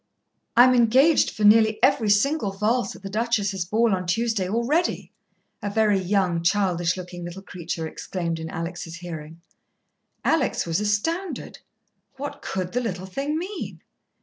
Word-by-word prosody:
"I'm 255 +1 +8
engaged 255 +6 +4
for 215 - -5
nearly 220 +1 +6
every 235 -5 +4
single 215 +3 +2
valse 210 +2 0
at - - -14
the 195 - -5
Duchess's 210 -4 0
ball 220 +3 +2
on 180 -1 -2
Tuesday 215 0 0
already!" 245 - 0 0.5
a 205 - -2
very 210 -1 +2
young, 185 -2 +1
childish 180 -1 +1
looking 180 -1 -7
little 175 +3 -7
creature 170 -3 -5
exclaimed 170 0 -4
in 160 0 -5
Alex' 165 0 -5
hearing. 165 -2 -8 0.8
Alex 310 -5 +1
was 165 +1 0
astounded. 325 - -2 0.6
What 285 +2 -6
could 185 -1 -3
the 250 - 0
little 190 -6 -4
thing 275 +11 -3
mean? 370 +3 -6
205 Hz, 145 wpm, -24 LUFS, 180-235 Hz, 0.8 s, I'm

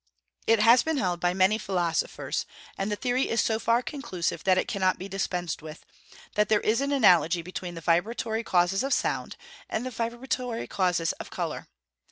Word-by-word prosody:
It 225 - +5
has 230 +3 +7
been 320 +2 -1
held 180 -7 0
by 175 +1 +1
many 190 +3 +3
philosophers 175 -6 -1 0.3
(and 195 +2 -2
the - - +1
theory 250 +3 0
is 230 - 0
so 220 -1 +1
far 230 +2 +2
conclusive 235 - -3
that 185 -1 +4
it - - 0
cannot 190 -3 +1
be 190 - -7
dispensed 180 -4 -3
with) 155 0 -10 0.5
that 210 0 +2
there 215 -1 +3
is 225 +4 +1
an 280 +1 -1
analogy 180 - +4
between 180 0 -6
the 165 - -7
vibratory 220 +7 0
causes 180 0 +2
of 275 - +2
sound, - - -2 0.3
and 225 - -2
the 255 - -4
vibratory 240 +1 -3
causes 175 -3 0
of - - -7
colour. - - -4
200 Hz, 185 wpm, -27 LUFS, 180-235 Hz, 0.5 s, has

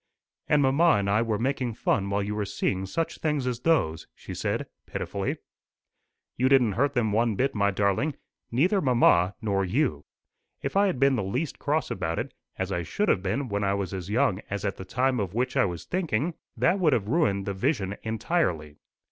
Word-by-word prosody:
"And 150 -1 +4
mamma 150 +6 +4
and 100 -1 -1
I 105 +3 +3
were 115 -2 0
making 125 -1 -1
fun 100 -2 0
while 100 0 0
you 105 +1 -3
were 105 0 -1
seeing 95 -1 -2
such 165 - -2
things 150 -4 0
as 125 -2 -2
those!" 105 - +1
she - - -9
said - - -2 0.2
pitifully. - - -3 1.0
"You 130 +2 +3
didn't 130 -5 +5
hurt 140 +7 +1
them 110 -4 +1
one 115 +1 +2
bit, 135 +6 +1
my 100 -1 +2
darling 100 +9 0 0.4
neither 180 - +2
mamma 110 - +4
nor 100 -2 +1
you. 95 - 0 0.6
If - - -3
I 200 +1 +5
had 180 -10 -1
been 135 -1 +4
the 105 - -1
least 125 +11 -3
cross 150 +2 0
about 85 -3 -2
it, - - -3 0.2
as - - -2
I 85 - -1
should 205 - -1
have 95 - +3
been 105 +9 -1
when 100 -2 -2
I 100 0 +1
was 100 -1 -3
as 95 -1 -5
young 110 -3 +1
as 100 0 -3
at 100 - -2
the 95 - -7
time 125 +3 +1
of 100 -1 -3
which 125 +1 0
I - - +4
was 85 -3 -5
thinking, 170 -3 -1 0.2
that 130 - +2
would 160 -6 +3
have 105 -5 0
ruined 105 - +1
the 100 - -2
vision 100 -2 -1
entirely. 110 - -1
115 Hz, 205 wpm, -27 LUFS, 100-140 Hz, 1.0 s, didn't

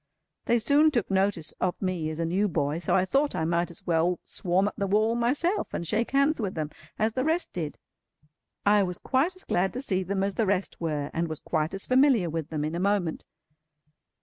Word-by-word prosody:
They 235 - +3
soon 285 +7 +4
took 235 -9 -1
notice 190 -5 +1
of 180 -1 0
me 180 -5 -2
as 155 - -5
a 165 - 0
new 190 +5 +1
boy, 150 -3 -1
so 170 - 0
I 185 -1 +3
thought 275 +8 +1
I 160 - 0
might 170 +1 0
as 170 - -10
well 170 +1 +1
swarm 185 +2 0
up - - -3
the 200 - -2
wall 215 +3 +2
myself, 285 - 0
and 170 - -3
shake 220 +7 0
hands 280 0 +2
with 195 -3 -3
them 155 -2 -3 0.3
as 220 +1 +1
the 255 - 0
rest 325 +4 0
did. 160 -4 -4 0.9
I 205 0 +5
was 180 -2 -1
quite 285 +8 0
as 370 - -12
glad 185 +2 0
to 255 - -4
see 190 -7 0
them 190 +1 -1
as 200 0 0
the 220 0 0
rest 190 -2 -1
were, 150 -3 -2
and 165 +1 -1
was 155 -2 -5
quite 155 +4 -1
as 195 - -4
familiar 255 - +4
with 160 -1 -3
them 150 -2 -2
in 155 - -3
a 170 - -2
moment. 190 -4 0
190 Hz, 225 wpm, -27 LUFS, 170-235 Hz, 0.9 s, I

